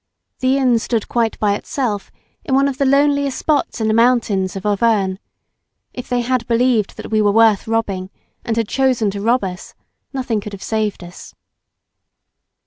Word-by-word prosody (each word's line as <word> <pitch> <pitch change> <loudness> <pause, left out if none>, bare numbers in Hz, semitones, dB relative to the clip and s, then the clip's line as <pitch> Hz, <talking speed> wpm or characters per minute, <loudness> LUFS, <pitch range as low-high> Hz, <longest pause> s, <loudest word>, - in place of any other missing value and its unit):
The 260 +1 +2
inn 250 -4 +3
stood 225 -1 -2
quite 230 -2 0
by 205 -1 +1
itself 210 -1 -3 0.3
in 275 -8 0
one 275 +1 +3
of 270 -1 -4
the 275 - +2
loneliest 280 0 +2
spots 295 -5 0
in 220 - 0
the 215 - +2
mountains 225 -5 +2
of 195 +1 -6
Auvergnes. 205 -2 +1 0.7
If 250 - -8
they 245 0 +1
had 245 -1 -1
believed 235 -3 +1
that - - -8
we 215 -1 +3
were 205 -1 +3
worth 220 -1 +3
robbing, 200 -5 -2 0.3
and 230 -1 -2
had 225 -2 0
chosen 255 -6 +1
to 200 0 -6
rob 235 +3 +2
us, 180 -1 -7 0.4
nothing 250 -6 -2
could 205 0 -8
have 195 - -8
saved 215 -4 -2
us. 175 +1 -12
225 Hz, 175 wpm, -18 LUFS, 205-255 Hz, 0.7 s, inn